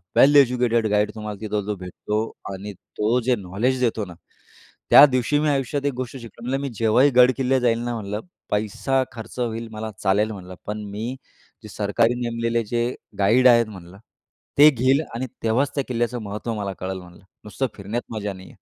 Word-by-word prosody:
वेल 145 +2 +6
educated 120 -4 +4
guide 105 0 +2
तुम्हाला 105 -2 -6
तिथं 105 -1 -2
जो 105 -1 -2
भेटतो 95 +4 -3 0.3
आणि 100 +2 -7 0.3
तो 110 +4 +2
जे 125 0 +2
नॉलेज 105 +7 -1
देतो 110 -3 0
ना, 90 - -10 0.8
त्या 145 - +10
दिवशी 130 +2 +1
मी 150 0 +1
आयुष्यात 140 +1 -1
एक 140 - +1
गोष्ट 130 +2 -5
शिकलो 115 -1 -12
म्हटलं, 135 +3 -1
"मी 140 - -3
जेव्हाही 120 +5 +4
गडकिल्ले 130 +1 +4
जाईल 115 -2 +2
ना," 120 0 -2
म्हटलं, 105 +1 -4 0.3
"पैसा 110 +6 0
खर्च 115 +2 -9
होईल 115 -1 -2
मला 110 0 -5
चालेल," 105 +3 +1
म्हणलं, 95 -2 -9
"पण 105 0 -4
मी 115 +5 -4 0.5
जे 105 - -10
सरकारी 110 +4 +1
नेमलेले 115 0 -1
जे 120 0 +2 0.3
गाईड 120 +6 +5
आहेत," 115 -2 +5
म्हटलं. 90 -1 -12 0.6
"ते 150 +1 +9
घेईल 135 +2 +2
आणि 130 +2 -3 0.2
तेव्हाच 120 +5 +1
त्या 140 - 0
किल्ल्याचं 120 -1 -1
महत्व 105 +3 -4
मला 100 -2 -3
कळेल," 95 0 -4
म्हणलं, 90 +1 -16 0.2
"नुसतं 130 +5 -2
फिरण्यात 110 +5 -5
मजा 105 -2 -3
नाहीये." 95 0 -13
115 Hz, 180 wpm, -23 LUFS, 105-125 Hz, 0.8 s, त्या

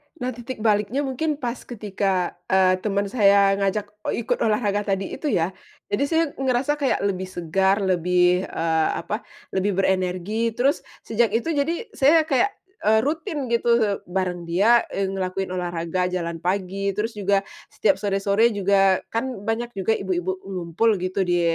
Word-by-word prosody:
Nah, 255 0 -3
titik 240 -1 -7
baliknya 215 +5 +1
mungkin 295 +4 -1
pas 245 -2 -4
ketika, 195 -5 -1
eee, 185 -1 +3
teman 200 0 -1
saya 200 -3 +5
mengajak, 205 +1 -1 0.2
eee, 235 - -1
ikut - - -1
olahraga 210 -2 +1
tadi 195 0 -1
itu 300 - -4
ya, 170 -2 +1 0.4
jadi 230 +7 +1
saya 325 +2 +2 0.2
ngerasa 265 +2 +1
kayak 270 -7 +1
lebih 190 -2 -1
segar, 190 +3 +1
lebih, 180 0 +2
eee, 160 -1 0
apa, 210 +3 -4 0.3
lebih 190 0 0
berenergi, 190 +4 0
terus 275 +6 +2 0.2
sejak 225 0 +1
itu 280 +9 0
jadi 325 +9 -1
saya 310 +4 +4
kayak, 290 +7 +2 0.4
eee, 220 +1 +5
rutin 300 - -3
gitu 235 -3 +2
bareng 180 -2 -2
dia, 215 +8 +4
eee, 195 - 0
ngelakuin 190 0 -3
olahraga 175 0 -2
jalan 170 -2 -3
pagi, 195 +2 -1
terus 225 +2 -1
juga 200 -1 +2 0.3
setiap - - +2
sore-sore 200 +2 +2
juga 195 -1 +3
kan 230 +3 0 0.2
banyak 235 +2 -2
juga 195 +3 +1
ibu-ibu 185 0 -2
ngumpul 185 +4 0
gitu 185 +1 -1
di 175 -1 +1
200 Hz, 155 wpm, -23 LUFS, 185-235 Hz, 0.4 s, saya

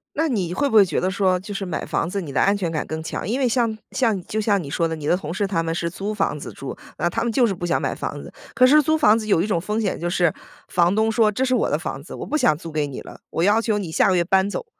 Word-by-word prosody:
那 320 +2 +1
你 190 - -1
会 280 +10 0
不 225 - -4
会 205 -2 +8
觉 170 - -1
得 185 - 0
说， 190 -2 +1
就 200 +3 -8
是 195 - -3
买 180 -4 -4
房 165 - -1
子， 200 - -2
你 150 -6 -7
的 130 - +1
安 200 +1 +3
全 175 -4 -2
感 155 - -2
更 160 0 -4
强。 165 - -5
因 240 +5 0
为 260 -3 +2
像 230 -2 +1 0.2
像 235 -5 +1
你 - - -9
就 215 +5 -3
像 205 -2 +2
你 140 - -8
说 165 +3 0
的 160 - -3
你 150 -1 -7
的 175 - +3
同 165 -3 -6
事 200 +2 -1
他 170 -4 0
们 165 0 -2
是 170 0 -2
租 195 +5 -4
房 195 -7 -1
子 - - -8
住， 135 - -7 0.2
那 175 - +1
他 230 +6 -2
们 235 -1 -1
就 245 -1 +4
是 200 - -1
不 175 - -7
想 175 - +1
买 - - -1
房 - - -5
子。 - - -11 0.2
可 255 - +6
是 300 +3 +6
租 315 +2 +1
房 215 -7 +5
子 220 -1 -4
有 195 - +3
一 185 - +1
种 185 -6 0
风 210 +5 -2
险， 205 -4 -1
就 175 +1 -2
是 175 -3 +2 0.4
房 175 +2 +2
东 220 0 +2
说： 220 -2 +3
“这 255 +6 -1
是 255 - +1
我 245 - +1
的 150 - +1
房 140 -3 -5
子， 155 - -10
我 - - -6
不 305 - -1
想 155 - +3
租 165 -3 -9
给 150 -1 0
你 135 - -7
了， - - -12
我 165 - -1
要 210 +3 +4
求 215 -2 0
你 180 -6 -5
下 - - +3
个 185 - +3
月 175 - +2
搬 190 +2 +2
走。” 465 - -5
195 Hz, 355 characters per minute, -22 LUFS, 170-220 Hz, 0.4 s, 会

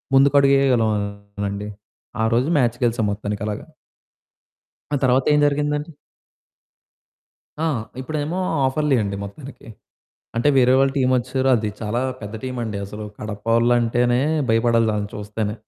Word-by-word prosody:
ముందుకడుగేయగలమండి. 110 -8 +2 0.6
ఆ - - +3
రోజు 125 +6 +1
మ్యాచ్ 120 -3 +2
గెలిసాం 115 -1 +1
మొత్తానికలాగా. 105 +4 -4 1.3
ఆ - - +1
తర్వాతేం 135 +3 +3
జరిగిందండి? 150 +2 -1 1.7
ఆ! - - +1 0.4
ఇప్పుడేమో 155 +4 -3 0.3
ఆఫర్లీ 140 +1 +1
అండి 100 -1 -3
మొత్తానికి. 130 +8 -10 0.7
అంటే 120 +5 +1
వేరే 125 0 +5
వాళ్ళ 135 0 +3
టీమ్ 130 -1 +2
ఒచ్చేసారు 130 +2 0
అది 110 -2 -1
చాలా 115 +3 -1 0.2
పెద్ద 105 0 -7
టీమండి 120 -5 -3
అసలు 105 +2 -8 0.2
కడపవొళ్ళంటేనే 115 +3 +1 0.3
భయపడాలి 115 0 +3
ఆళ్ళని 105 0 -3
చూస్తేనే. 105 +1 -4
120 Hz, 105 wpm, -21 LUFS, 105-135 Hz, 1.7 s, వేరే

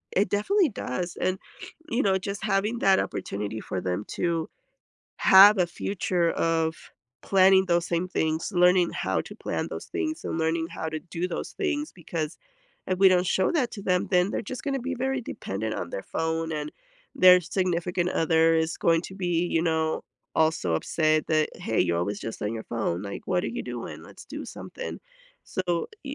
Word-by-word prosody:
It 195 +1 +3
definitely 340 - +2
does, 175 - -4
and 185 +1 0 0.5
you 235 +3 +1
know, 190 -1 +3
just 200 +1 -5
having 210 +3 0
that 195 -3 +4
opportunity 105 +2 -3
for 95 - -4
them 90 +3 -2
to 170 -2 -1 0.7
have 200 +2 +8
a 180 - +3
future 175 -1 -1
of 165 -1 0 0.5
planning 190 0 +5
those 170 -1 +2
same 170 +1 -1
things, 160 +1 -1
learning 180 -1 +4
how - - -1
to - - -11
plan - - -3
those - - -7
things, 315 -3 -3
and - - -2
learning 165 0 0
how 160 - -4
to 155 0 -4
do 170 +1 -4
those 180 - -4
things, 310 -7 -2
because 165 -3 -5 0.5
if 185 -1 -1
we 195 0 +7
don't 180 0 +3
show 185 +1 +2
that 270 -8 +1
to 200 - -7
them, 180 -2 +1
then 180 +1 +3
they're - - -2
just 255 +4 -6
gonna 275 -1 -1
be 265 +1 -3
very 265 +1 -1
dependent 110 - -4
on - - -4
their 95 - -4
phone, 160 0 -2
and 150 -1 -3 0.5
their 180 0 +8
significant 180 0 -1
other 165 -1 +3
is 160 0 0
going 165 -1 +3
to 190 - -9
be, 175 -2 0
you 165 - +2
know, 160 -1 0 0.3
also 155 - +2
upset 155 - +1
that, 155 -1 +2
"Hey, 110 - -1
you're 85 -1 +1
always 100 +4 -2
just 115 - -6
on 105 +2 -2
your 110 - -5
phone," 100 -6 -2
like, 100 -1 -7
"What 180 -1 +1
are - - -1
you 240 - -4
doing? - - -7
Let's - - -13
do - - -7
something." - - -7 0.4
So, 175 -2 -2 0.2
y 275 0 -5
175 Hz, 190 wpm, -26 LUFS, 160-195 Hz, 0.7 s, have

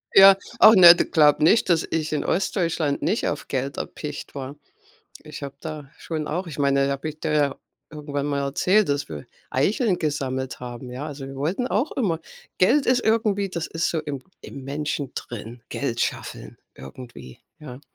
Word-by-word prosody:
Ja. 195 0 +10 0.2
Ach, 220 - +9
ne, 175 -2 +10
du - - 0
glaube 150 -1 +4
nicht, 210 +4 +4
dass 165 -2 +3
ich 155 -1 -2
in 150 - -1
Ostdeutschland 170 -6 0
nicht 225 - 0
auf - - -4
Geld 135 +1 -3
erpicht 150 -1 -6
war. 135 +1 -6 0.7
Ich 155 -1 -10
habe 140 -1 -6
da 155 -3 -7
schon 155 -2 -5
auch 180 +4 -3
ich 150 -3 -8
meine, 140 -1 +2
da 140 - 0
habe 140 +3 -4
ich 155 0 -9
dir 155 -2 -1
ja 145 -2 +1 0.3
irgendwann 145 -2 -4
mal 140 -1 -1
erzählt, 180 +9 +2
dass 145 0 -1
wir 75 -2 -8 0.2
Eicheln 190 - +1
gesammelt 135 -5 -3
haben, 125 0 -8
ja, 130 +5 -5
also, 140 -2 -7
wir 135 0 -9
wollten 180 - -1
auch 250 +9 0
immer 185 -11 0 0.4
Geld 270 +10 +4
ist 250 0 +3
irgendwie, 215 -3 +1
das 170 -3 -4
ist 165 0 -1
so 165 - -1
im 145 -3 -5 0.2
im 135 -2 -10
Menschen 145 -1 -3
drin. 120 0 -8
Geld - - -3
scheffeln - - -4 0.2
irgendwie, 70 - -11 0.2
ja. 135 -3 -10
150 Hz, 185 wpm, -23 LUFS, 140-175 Hz, 0.7 s, Ja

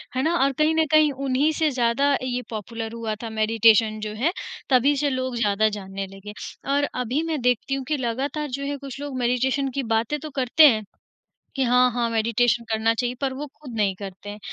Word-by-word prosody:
है 260 - +1
ना 335 +2 +1
और 275 - +3
कहीं 310 +1 +3
न 320 - +4
कहीं 310 -1 +5
उन्हीं 275 +2 +1
से 315 -1 +2
ज़्यादा 260 +3 +2
ये 250 -1 -2
पॉपुलर 225 +1 -5
हुआ 225 -2 -3
था 225 - -4
मेडिटेशन 220 0 +3
जो 210 - -6
है 335 - +3 0.4
तभी 275 +2 +4
से 290 0 +1
लोग 255 -1 -2
ज़्यादा 215 -1 +2
जानने 195 -1 -5
लगे। 195 +2 -10 0.4
और 285 - +2
अभी 250 +4 -1
मैं 315 -5 -2
देखती 250 +2 +1
हूँ 270 - -4
कि 300 - 0
लगातार 270 +5 -2
जो - - -4
है 285 0 -3
कुछ 275 -1 -8
लोग 285 -2 -5
मेडिटेशन 255 +3 +1
की 275 - -1
बातें 230 +7 0
तो 310 - -7
करते 275 +3 +5
हैं 220 -5 +2 0.7
कि 270 - +1
हाँ, 250 +1 +4
हाँ 235 0 0
मेडिटेशन 230 +1 +1
करना 220 +1 +2
चाहिए 245 +1 -1
पर 270 -2 -1
वो 290 +3 -5
खुद 265 -6 -9
नहीं 200 -3 +1
करते 195 0 -9
हैं, 210 - -8
250 Hz, 210 wpm, -24 LUFS, 225-280 Hz, 0.7 s, कहीं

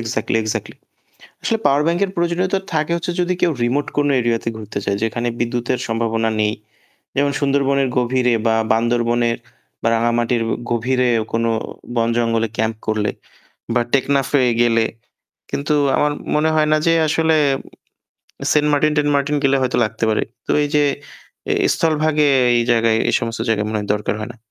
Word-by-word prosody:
Exactly, 115 0 -2
exactly. 110 - -4 0.7
আসলে 225 - 0
পাওয়ার 140 +1 +4
ব্যাংকের 175 +4 +1
প্রয়োজনীয়তা 175 +3 0
থাকে 155 +1 0
হচ্ছে, 170 +1 -3
যদি 180 +1 0
কেউ 170 - +3
রিমোট 135 +4 0
কোন 145 0 +2
এরিয়াতে 115 -1 -1
ঘুরতে 110 -1 -5
যায়, 100 - 0
যেখানে 120 +2 -1
বিদ্যুতের 120 +1 -1
সম্ভাবনা 115 0 0
নেই। 105 0 +1 0.6
যেমন, 140 +1 +2
সুন্দরবনের 140 -1 +1
গভীরে 125 0 +2
বা 115 - +3 0.2
বান্দরবনের 120 0 +1 0.4
বা - - -1
রাঙামাটির 120 +1 +1 0.3
গভীরে 125 +2 +1 0.2
কোন 115 0 0 0.5
বনজঙ্গলে 115 0 +1
ক্যাম্প 110 0 0
করলে 110 -1 0 0.7
বা 120 - +4
টেকনাফে 140 0 +2 0.2
গেলে। 115 -1 +3 0.7
কিন্তু, 150 +2 -1 0.2
আমার 150 0 +2 0.2
মনে 155 +1 +2
হয় 155 -1 +3
না - - +5
যে 165 - +4 0.2
আসলে, 160 +1 +2 1.2
সেন্ট 150 0 +3
মার্টিন-টেন্ট 150 0 +2
মার্টিন 140 +1 0
গেলে 140 0 +3
হয়তো 130 -1 0
লাগতে 110 - -5
পারে। 110 - +1 0.2
তো, - - 0
এই - - 0
যে 150 - +4 0.9
স্থলভাগে, 155 -2 +1 0.3
এই 120 - +2
জায়গায় 115 -1 +3 0.2
সমস্ত 115 -1 -4
জায়গায় 105 -2 +1
মনে 110 - -1
হয় 105 - -6
দরকার 105 - -2
হয় 110 - -5
না। - - -20
125 Hz, 150 wpm, -19 LUFS, 115-150 Hz, 1.2 s, না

